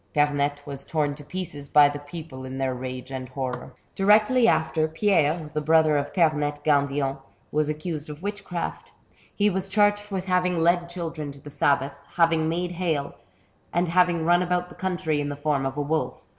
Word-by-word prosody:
Pernette 145 -1 +1
was 140 -1 -5
torn 150 -3 0
to 145 +1 -11
pieces 145 -4 -5
hy 145 -1 +9
the 145 0 -4
people 145 -2 -8
in 130 0 -6
their 135 -1 0
rage 130 +1 -6
and 130 -1 -5
horror. 130 -1 -5 0.2
Directly 215 +5 +4
after, 160 -2 +2
Pierre, 160 -3 +1
the 150 - -1
hrother 155 0 +4
of 145 - -1
Pernette 150 -4 +1
Gan 145 -2 +3
dillon, 140 -1 -2 0.3
was 150 0 +1
accused 155 0 -4
of 150 +3 -9
witchcraft. 195 -4 -5 0.4
He 205 - +3
was 190 +1 -3
charged 205 +1 +2
with 190 -2 -3
having 180 -1 +1
led 170 +1 +2
children 165 -4 -5
to 140 - -13
the 145 +1 -11
sabbath, 140 0 +1 0.2
having 165 -2 +3
made 175 +2 -1
hail, 165 -5 -1 0.6
and 175 +1 +1
having 175 -2 +3
run 175 +1 +4
about 180 0 0
the - - -12
country 175 -5 -1
in 145 - -2
the 145 - -4
form 145 -2 0
of 135 +1 -6
a - - 0
wolf. 155 +2 -1
155 Hz, 185 wpm, -25 LUFS, 145-180 Hz, 0.6 s, hy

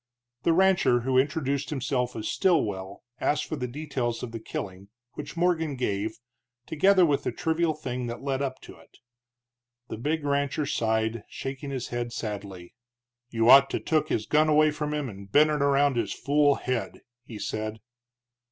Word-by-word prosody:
The 170 - +2
rancher, 180 -8 +4
who 130 +1 +2
introduced 140 -1 -1
himself 125 -3 -1
as 110 -1 -4
Stilwell, 100 - 0 0.2
asked 150 +1 0
for - - -4
the 125 -4 -3
details 125 -3 -3
of 120 - -5
the 115 - -6
killing, 100 -3 -6 0.3
which 150 +2 -8
Morgan 165 -4 +1
gave, 110 -3 -2 0.5
together 185 +4 +4
with 145 -3 +1
the - - -2
trivial 160 -1 0
thing 125 -4 -4
that 120 +3 -6
led 135 -1 -1
up 130 -2 -3
to - - -12
it. - - -21 0.9
The - - -5
big 150 +6 -1
rancher 140 +1 0
sighed, 110 -2 0
shaking 135 +1 -6
his 130 -3 -4
head 120 0 -3
sadly. 100 -6 -6 0.6
"You 115 -1 +1
ought 135 +2 +8
to - - -2
took 155 -1 0
his 110 - -1
gun 155 +1 +3
away 155 0 +5
from 150 0 -3
him 150 -2 -2
and 100 -3 -10
bent 150 +4 +5
it 150 -1 0
around 140 -1 +3
his - - -1
fool 145 0 +2
head," 125 -2 -3 0.2
he 115 -3 -9
said. 110 +2 -4
135 Hz, 170 wpm, -27 LUFS, 115-150 Hz, 0.9 s, ought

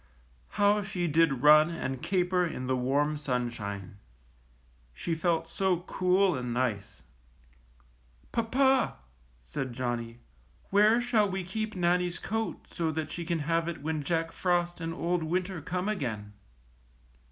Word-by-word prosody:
How 205 +1 +4
she 195 -3 -2
did 150 -4 +2
run 155 +2 +7
and 135 -6 -4
caper 180 -1 +1
in 155 -7 -3
the 130 0 +1
warm 140 +4 +1
sun 125 -5 -1
shine! 100 -4 -6 1.0
She 120 - -2
felt 165 0 0
so 185 -1 0
cool 185 0 +2
and 125 -1 -3
nice! 120 -5 -2 1.3
^^Papa," 260 +3 +2 0.5
said 135 -4 -4
Johnnie, 120 -2 -3 0.6
^Vhere 210 +3 +6
shall 220 -4 +2
we 190 0 -3
keep 215 +4 -4
Nannie's 175 0 +1
coat 225 0 -3
so 165 -2 -2
that 155 -1 -3
she 175 - -4
can 170 -1 -1
have 165 +1 +1
it 170 -4 -5
when 155 0 -1
Jack 165 +2 -1
Frost 175 -1 0
and 165 0 -3
Old 175 +1 -1
Winter 180 +2 -2
come 180 +5 -3
again?" 110 - -3
165 Hz, 140 wpm, -29 LUFS, 135-185 Hz, 1.3 s, run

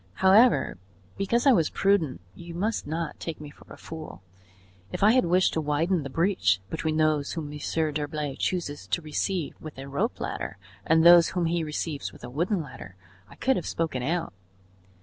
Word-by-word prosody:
However, 195 - +4 0.4
because 230 +6 0
I 275 - +7
was 165 -10 +3
prudent 190 - +1
you 170 - -10
must 210 +2 -2
not 165 +1 -4
take 165 -2 -5
me 150 -1 -9
for - - -19
a - - -10
fool. 155 - -9 0.7
If - - -2
I 210 - +7
had 255 -3 +3
wished 180 +2 +3
to 160 - 0
widen 160 +4 +1
the 140 - -6
breach 150 - +2
between 160 -1 -1
those 155 -2 +1
whom 150 -3 -5
Monsieur 155 +1 -1
d'Herblay 150 -1 -3
chooses 145 - -3
to 95 - -1
receive 155 +2 -2
with 155 -3 -9
a 135 +1 -7
rope 140 +1 -2
ladder 65 +10 -4 0.3
and 160 0 +4
those 170 -1 +8
whom 180 -2 -1
he 165 0 0
receives 150 -1 -4
with - - -16
a 120 - -7
wooden 170 - 0
ladder, 125 -9 -11 0.3
I - - -14
could 265 0 +1
have 175 - -4
spoken 160 -6 -2
out." 165 - -2
160 Hz, 190 wpm, -26 LUFS, 145-175 Hz, 0.7 s, those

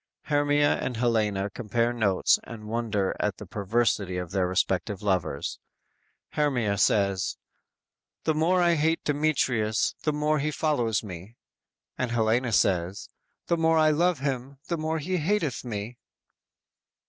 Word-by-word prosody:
"_ - - -17
Hermia 145 0 +3
and 125 - -3
Helena 105 -4 0
compare 115 +2 -1
notes 100 -6 +2
and 110 -2 -9
wonder 110 -4 -1
at 105 -2 -1
the 105 - -9
perversity 100 -1 0
of 90 -1 -5
their 95 -2 +1
respective 95 +2 -1
lovers. 90 -8 -1 0.7
Hermia 120 -9 0
says: 100 -2 +2 0.9
"The 160 - +2
more 165 +4 +2
I 170 0 +4
hate 160 +1 +1
Demetrius, 135 -7 +1
the 155 - +1
more 150 +1 +1
he 150 +2 0
follows 130 -9 0
me;" 95 +2 -9 0.6
And 125 - 0
Helena 115 +1 +1
says: 95 -2 +1 0.4
_"The 170 - +1
more 165 0 +3
I 155 -1 +5
love 170 +2 +2
him, 135 -1 -3
the 170 - 0
more 160 +1 -1
he 180 +4 -2
hateth 160 - 0
me!" 115 0 -5
120 Hz, 140 wpm, -27 LUFS, 100-150 Hz, 0.9 s, I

